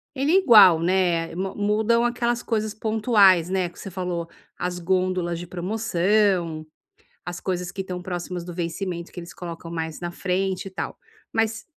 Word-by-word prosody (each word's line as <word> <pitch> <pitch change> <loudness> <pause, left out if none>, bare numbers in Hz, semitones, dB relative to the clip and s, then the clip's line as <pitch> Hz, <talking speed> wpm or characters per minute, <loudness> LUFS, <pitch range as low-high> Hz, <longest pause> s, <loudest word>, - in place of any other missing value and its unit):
ele 275 +4 +1
é - - +5
igual, 205 - +8
né, 170 -2 +1
ma 190 +1 -3
mudam 215 +3 +2
aquelas 240 0 0
coisas 215 -2 -2
pontuais, 210 -5 +4
né, 185 -2 0
que 170 - -15
você 195 - -8
falou: 175 -2 -3 0.3
as 180 0 -3
gôndolas 180 -1 0
de 175 - -6
promoção, 180 -3 0 0.6
as 175 0 -6
coisas 180 -1 -3
que 195 - -6
estão 180 -1 -5
próximas 180 -1 -5
do 175 - -7
vencimento 170 0 -4
que - - -11
eles 170 - -10
colocam 170 -1 -8
mais 160 -2 -4
na 175 -1 -4
frente 185 +2 -2
e 195 - -6
tal. 185 - -5 0.3
Mas 225 0 0
185 Hz, 170 wpm, -24 LUFS, 175-210 Hz, 0.6 s, igual